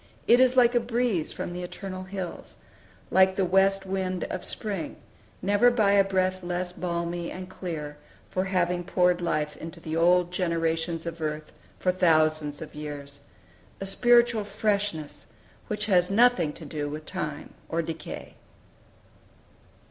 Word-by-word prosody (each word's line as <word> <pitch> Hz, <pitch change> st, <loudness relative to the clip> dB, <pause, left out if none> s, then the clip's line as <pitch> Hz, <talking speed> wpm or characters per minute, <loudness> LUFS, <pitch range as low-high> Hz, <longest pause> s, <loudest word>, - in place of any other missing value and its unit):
It 240 Hz, +2 st, +7 dB
is 260 Hz, 0 st, +4 dB
like 245 Hz, -1 st, +6 dB
a 240 Hz, -, +4 dB
breeze 230 Hz, -7 st, 0 dB
from 175 Hz, -, -5 dB
the 180 Hz, -, -5 dB
eternal 185 Hz, +1 st, -6 dB
hills; 190 Hz, -2 st, -6 dB, 0.6 s
like 190 Hz, +1 st, +5 dB
the 190 Hz, -, +2 dB
west 195 Hz, +1 st, +3 dB
wind 185 Hz, -1 st, -2 dB
of 185 Hz, -, -4 dB
spring, 195 Hz, -7 st, -3 dB, 0.5 s
never 205 Hz, +5 st, +5 dB
by 220 Hz, -5 st, +3 dB
a 200 Hz, 0 st, +6 dB
breath 185 Hz, -1 st, 0 dB
less 175 Hz, 0 st, -3 dB
balmy 170 Hz, -1 st, -3 dB
and 185 Hz, 0 st, -7 dB
clear 155 Hz, -6 st, -6 dB, 0.3 s
for 185 Hz, +1 st, -1 dB
having 180 Hz, -2 st, 0 dB
poured 180 Hz, 0 st, +2 dB
life 150 Hz, -3 st, -1 dB
into 165 Hz, +2 st, -8 dB
the 160 Hz, -1 st, -4 dB
old 175 Hz, +1 st, +4 dB
generations 165 Hz, -2 st, -1 dB
of 170 Hz, -1 st, -6 dB
earth 155 Hz, 0 st, -3 dB, 0.3 s
for 185 Hz, -, +1 dB
thousands 155 Hz, -4 st, +2 dB
of 155 Hz, -, -12 dB
years; 145 Hz, -2 st, -7 dB, 0.6 s
a 195 Hz, -, -4 dB
spiritual 235 Hz, +2 st, +4 dB
freshness, 200 Hz, -, -2 dB, 0.4 s
which 210 Hz, 0 st, -2 dB
has 180 Hz, -3 st, +3 dB
nothing 210 Hz, -6 st, +4 dB
to 160 Hz, -, -10 dB
do 145 Hz, 0 st, -4 dB
with 155 Hz, +1 st, -6 dB
time 150 Hz, -6 st, -5 dB, 0.2 s
or 165 Hz, +1 st, 0 dB
decay. 160 Hz, -1 st, -7 dB
180 Hz, 150 wpm, -27 LUFS, 165-195 Hz, 0.6 s, It